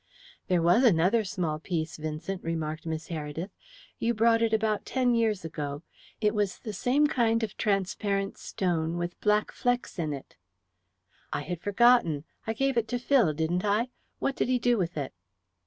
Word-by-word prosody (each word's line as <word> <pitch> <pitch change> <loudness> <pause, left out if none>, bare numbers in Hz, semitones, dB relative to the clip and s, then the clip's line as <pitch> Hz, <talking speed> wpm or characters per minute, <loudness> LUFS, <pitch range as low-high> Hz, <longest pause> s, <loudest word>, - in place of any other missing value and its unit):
"There 180 -2 +2
was 175 +9 +5
another 205 +1 +4
small 170 -5 -2
piece, 160 -1 -3
Vincent," 155 +5 -4
remarked 160 -1 -3
Miss 160 +2 -4
Heredith. 160 +3 -4 0.5
"You 235 +1 +1
brought 225 +1 +4
it 230 -1 +2
about 220 -1 +1
ten 255 -2 +1
years 220 -6 +1
ago. 145 -1 -4 0.4
It 210 -1 +2
was 205 -3 0
the 215 -4 -7
same 255 +8 +2
kind 230 -5 +2
of 215 -2 -3
transparent 195 0 -1
stone, 170 -3 -1
with 175 0 -4
black 210 0 +2
flecks 245 -5 -1
in 155 -3 -1
it." 140 -2 -8 0.9
"I - - -1
had 175 +2 -5
forgotten. 205 -8 +4 0.2
I 225 - 0
gave 270 +2 0
it 230 -1 +2
to 245 - -1
Phil, 245 - +3
didn't 160 +4 0
I? 210 +4 +1 0.3
What 275 - -1
did - - 0
he 255 0 +3
do 245 0 +2
with 175 -6 -2
it?" 140 -3 -3
195 Hz, 170 wpm, -28 LUFS, 165-230 Hz, 0.9 s, was